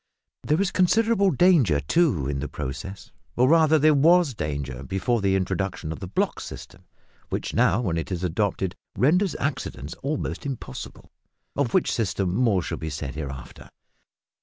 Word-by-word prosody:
There 150 +3 +1
is 200 -2 +1
considerable 200 +2 +3
danger, 145 - +4
too, 85 - +1
in 70 -1 -2
the 75 - -3
process, 75 +9 -7 0.2
or 125 +1 +4
rather 160 0 +5
there 155 +1 +5
was 165 +1 +4
danger 70 - -4
before 95 - -1
the 95 -1 +2
introduction 95 -3 -2
of 80 - -6
the 95 - -6
"block 95 - -1
system," - - -10 0.4
which - - -3
now, 100 +8 +3
when 90 -8 -1
it 80 - -6
is 90 -1 -3
adopted, 95 +1 -1 0.2
renders 180 +8 +3
accidents 100 - -3
almost 145 +2 -3
impossible, 135 -4 -7 0.4
of 140 -5 0
which 185 - +3
system 95 -5 -1
more 105 -5 +2
shall - - -4
be 80 - -4
said 70 -2 -5
hereafter. 70 -4 -8
100 Hz, 160 wpm, -25 LUFS, -, 0.4 s, rather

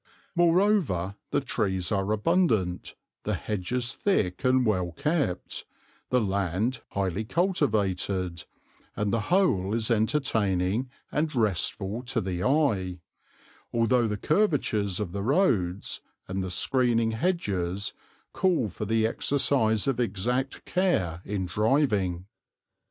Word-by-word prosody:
Moreover 170 - +2
the 145 - +1
trees 95 -9 -1
are 100 0 0
abundant, 110 - +1 0.3
the - - -1
hedges 120 +5 -2
thick 105 - 0
and 130 0 +3
well 90 -5 0
kept, 145 - -1 0.5
the 125 - +3
land 100 +3 -1
highly 100 +1 -1
cultivated, 100 - 0 0.5
and 105 0 -1
the 115 - +2
whole 115 - +2
is 115 +1 0
entertaining 110 -3 +1 0.2
and 150 -1 -1
restful 105 0 0
to 130 - -1
the 90 -2 -3
eye, 105 - +1 0.7
although 115 +1 +2
the 105 -1 -2
curvatures 115 - +1
of 100 -5 -3
the 100 +2 -3
roads 105 - +1 0.3
and 95 +1 -2
the 95 - -4
screening 115 +3 +2
hedges 100 - -1 0.4
call 170 - +1
for 105 - -5
the 110 +1 +2
exercise 115 -3 +2
of 135 -3 0
exact 125 +5 -1
care 95 - 0
in 100 -2 -2
driving. 105 - +1
110 Hz, 115 wpm, -27 LUFS, 95-135 Hz, 0.7 s, and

